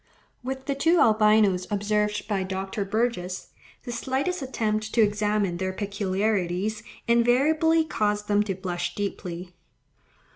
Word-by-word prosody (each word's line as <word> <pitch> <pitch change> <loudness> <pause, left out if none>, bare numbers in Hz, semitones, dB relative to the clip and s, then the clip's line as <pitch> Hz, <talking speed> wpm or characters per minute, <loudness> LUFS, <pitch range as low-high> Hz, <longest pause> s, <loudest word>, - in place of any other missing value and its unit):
With 265 +1 -5
the 280 - 0
two 325 +5 +3
albinos 215 -4 +4
observed 210 0 0
by 205 -3 0
Dr. 190 +2 -3
Burgess, 195 -4 -2 0.3
"the 245 - -6
slightest 270 +9 -2
attempt 215 -4 -2
to 235 - +5
examine 205 -3 +1
their 185 +1 -2
peculiarities 200 0 -1 0.3
invariably 295 +8 +3
caused 210 -6 -1
them 205 0 +3
to 195 -3 -2
blush 175 -2 -3
deeply." 180 -3 -5
210 Hz, 120 wpm, -26 LUFS, 195-235 Hz, 0.3 s, to